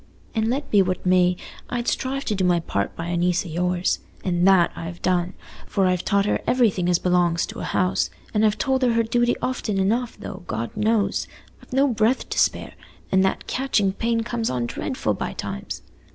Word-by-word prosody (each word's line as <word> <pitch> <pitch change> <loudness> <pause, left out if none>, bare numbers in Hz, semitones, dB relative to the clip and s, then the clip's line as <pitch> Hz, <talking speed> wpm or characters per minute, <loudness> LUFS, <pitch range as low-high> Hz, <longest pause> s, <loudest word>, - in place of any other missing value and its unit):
An' 220 0 +1
let 275 +4 -2
be 205 - +6
what 185 0 -1
may, 180 -1 +4 0.3
I'd 240 -1 -2
strive 270 +1 -1
to - - 0
do 190 -2 0
my 175 -1 +3
part 100 -11 -2
by 165 - -5
a 175 - -1
niece 175 +1 +1
o' - - -7
yours—an' 180 +1 -1
that 190 -3 +5
I've 165 +1 -6
done, 180 0 +1 0.3
for 195 - +1
I've 180 -1 +1
taught 200 -1 +2
her - - 0
everything 210 -8 +2
as 175 - +4
belongs 175 -1 +2
to - - -8
a - - -4
house, 90 -2 +1 0.2
an' 210 - +2
I've 215 -1 +3
told 265 -1 +1
her 245 -2 +3
her 230 0 +3
duty 240 +1 +2
often 235 -5 -1
enough, 225 +5 0
though, 205 -2 -8
God 115 +1 -4
knows, 210 0 +1 0.3
I've - - -19
no 270 +2 +3
breath 230 0 +1
to - - -1
spare, - - +1 0.4
an' 190 - +4
that 190 - 0
catchin' 220 -7 +1
pain 230 +2 0
comes 230 0 -2
on 125 -2 -1
dreadful - - -2
by - - -4
times. 65 - -6
195 Hz, 200 wpm, -23 LUFS, 175-230 Hz, 0.4 s, be